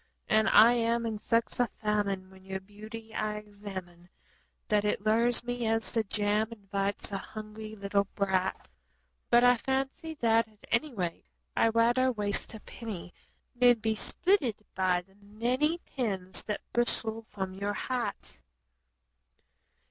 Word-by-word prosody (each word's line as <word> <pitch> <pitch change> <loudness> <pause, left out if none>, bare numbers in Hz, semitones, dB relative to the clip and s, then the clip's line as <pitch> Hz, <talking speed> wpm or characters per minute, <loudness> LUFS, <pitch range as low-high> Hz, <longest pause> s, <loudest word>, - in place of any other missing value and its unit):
And 220 0 +4
I 225 +3 +8
am 235 0 +1
in 220 -2 -2
such 230 +3 0
a 245 -2 +3
famine 200 -3 -1
when 190 0 -16
your 190 0 -4
beauty 215 +3 -10
I 215 0 -1
examine 195 -4 -8 0.6
That 210 -1 +3
it 210 0 0
lures 230 +2 +3
me 245 -1 -2
as 225 0 +1
the 225 - +1
jam 210 +1 +1
invites 200 -2 -2
a 195 - -2
hungry 215 +1 -8
little 200 0 +1
brat; 190 -1 0 0.6
But 240 0 +6
I 245 0 +6
fancy 270 +6 -2
that, 230 -4 +3
at 215 -1 -24
any 280 +7 +2
rate, 175 - -3 0.3
I'd 225 0 +3
rather 240 +3 +4
waste 210 -1 0
a - - -8
penny 200 -7 -7 0.4
Then 245 -1 +6
be 220 0 0
spitted 255 - +1
by 185 -1 +2
the 190 +2 -26
many 245 +10 0
pins 195 -8 -3
that 210 - -2
bristle 225 -2 0
from 190 -2 -4
your 200 +2 -2
hat. 235 - -3
215 Hz, 145 wpm, -30 LUFS, 200-235 Hz, 0.6 s, I